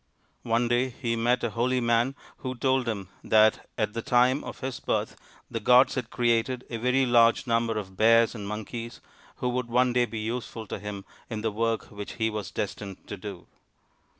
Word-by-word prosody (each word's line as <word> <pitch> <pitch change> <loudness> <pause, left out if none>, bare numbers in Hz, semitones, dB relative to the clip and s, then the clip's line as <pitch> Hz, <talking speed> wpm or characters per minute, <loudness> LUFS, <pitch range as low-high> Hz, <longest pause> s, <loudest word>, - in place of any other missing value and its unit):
One 115 +1 +1
day 120 +2 +2
he 120 -1 -2
met 120 +2 +1
a 120 - 0
holy 125 +3 +1
man 120 +2 +2 0.2
who 130 -1 -5
told 130 0 +1
him 100 -5 -3
that 110 0 +4
at 105 -2 0
the 115 - -3
time 125 +4 +3
of - - -8
his 130 -1 -4
birth - - -1 0.4
the 115 - -2
gods 125 +4 +5
had 125 -3 -3
created 120 +1 +1
a 115 - -2
very 125 +3 +2
large 115 -1 +4
number 115 -2 +1
of 95 -3 -6
Bears 115 +1 +5
and 105 -4 -6
Monkeys 115 +3 -6 0.4
who 125 - -2
would 125 -1 -2
one 125 +1 +2
day 125 0 +3
be 115 - -7
useful 115 0 -4
to - - -5
him 100 -1 -6 0.2
in 110 -3 -4
the 110 0 0
work 115 +1 -1
which 105 -1 -7
he 110 -1 0
was 105 -4 -4
destined 100 -1 -5
to - - -4
do. 100 -2 -8
115 Hz, 195 wpm, -27 LUFS, 110-125 Hz, 0.4 s, gods